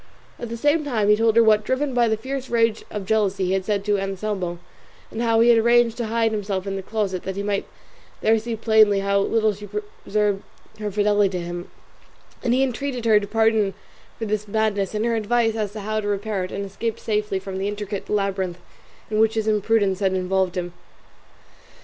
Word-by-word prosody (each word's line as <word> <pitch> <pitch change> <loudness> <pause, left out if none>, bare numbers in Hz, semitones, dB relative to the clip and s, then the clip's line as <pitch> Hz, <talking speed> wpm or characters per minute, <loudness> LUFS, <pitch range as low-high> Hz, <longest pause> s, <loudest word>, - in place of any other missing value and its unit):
At 235 - -5
the 230 - -4
same 295 +5 +2
time 225 -8 0
he 210 - +7
told 225 0 +2
her 230 - +7
what, 215 -1 +4
driven 260 +4 -1
by 240 -1 +3
the 220 -1 +1
fierce 265 +3 -5
rage 230 -2 +1
of 205 -2 -5
jealousy, 200 -2 +1
he 180 - -1
had 190 0 0
said 200 -1 -1
to 205 -1 +2
Anselmo, 195 -2 -3 0.5
and 225 - -4
how 230 -1 +3
he 235 - +5
had 235 -1 +6
arranged 235 0 +4
to 235 -2 -2
hide 225 0 +1
himself 200 -3 -2
in 195 -1 -3
the 195 - -3
closet 195 -2 -2
that 190 - -5
he 200 - -3
might 200 -1 -1 0.5
there 220 +1 +3
see 230 +1 -4
plainly 215 -2 +4
how 200 0 +2
little 215 +1 +2
she 205 +1 -10 0.3
preserved 205 -1 0 0.4
her 210 -1 -2
fidelity 205 -1 +2
to 175 - -4
him; 175 +1 -6 0.7
and 240 - +1
he 265 - +3
entreated 255 -1 -3
her 215 -2 +6
pardon 220 -3 +2 0.4
for 225 - -3
this 210 0 -2
madness, 210 -1 0
and 215 +2 0
her 235 -1 +1
advice 225 +1 +1
as 210 -2 -2
to 215 - -6
how 215 +2 -2
to 210 - -4
repair 205 -1 -1
it, - - -10
and 200 0 -3
escape 220 +3 -3
safely 210 -2 -1
from 190 0 -5
the 195 - -1
intricate 205 -1 -5
labyrinth 195 -3 -1 0.5
in 215 - +1
which 220 0 +3
his 220 -1 -1
imprudence 210 -2 +2
had 190 -2 +1
involved 185 0 0
him. 175 -1 -3
210 Hz, 210 wpm, -23 LUFS, 195-225 Hz, 0.7 s, he